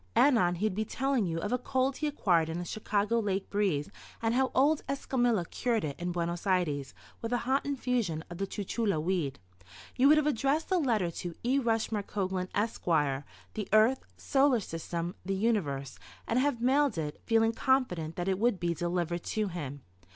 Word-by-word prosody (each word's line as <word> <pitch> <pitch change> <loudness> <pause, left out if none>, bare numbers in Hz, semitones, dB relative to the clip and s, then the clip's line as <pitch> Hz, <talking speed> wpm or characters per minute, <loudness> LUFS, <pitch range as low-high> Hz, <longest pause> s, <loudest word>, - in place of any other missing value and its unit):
Anon 225 -11 +4
he 190 +5 -1
would 215 - +1
be 215 +3 -1
telling 260 -2 0
you 165 -1 -2
of 210 - -3
a 250 - +1
cold 260 +1 0
he 305 - -1
acquired 175 - +2
in 165 - -3
a 175 - -4
Chicago 210 +3 0
lake 200 -3 -2
breeze 190 -8 0 0.3
and 225 0 0
how 260 +1 +2
old 295 +3 +4
Escamila 245 -8 +1
cured 235 -3 0
it 140 -2 -4
in 175 +1 -2
Buenos 170 +2 -3
Ayres 155 -8 0 0.3
with 230 - -4
a 245 - +2
hot 265 +2 +2
infusion 245 - -1
of 175 0 -9
the 195 - -1
chuchula 205 -2 -1
weed. 155 -5 -1 0.6
You 260 - +5
would 305 +2 +7
have 305 - +2
addressed 295 - 0
a 370 - +4
letter 220 - +1
to 170 0 -6
"E. 260 +4 +2
Rushmore 225 -3 0
Coglan, 190 -2 -3
Esq., 215 +2 -1 0.7
the 210 -3 -4
Earth, 220 +5 +4
Solar 270 -3 +3
System, 170 -1 -4
the 195 +1 -1
Universe," 165 - -1 0.3
and 235 - +2
have 275 -2 +1
mailed 270 -2 +3
it, 150 -2 -4
feeling 225 0 +3
confident 200 -12 0
that 175 +1 -3
it 190 -1 +1
would 230 -4 +2
be 170 -1 0
delivered 175 +1 -2
to 215 -2 -1
him. 145 -6 -6
210 Hz, 190 wpm, -30 LUFS, 175-250 Hz, 0.7 s, would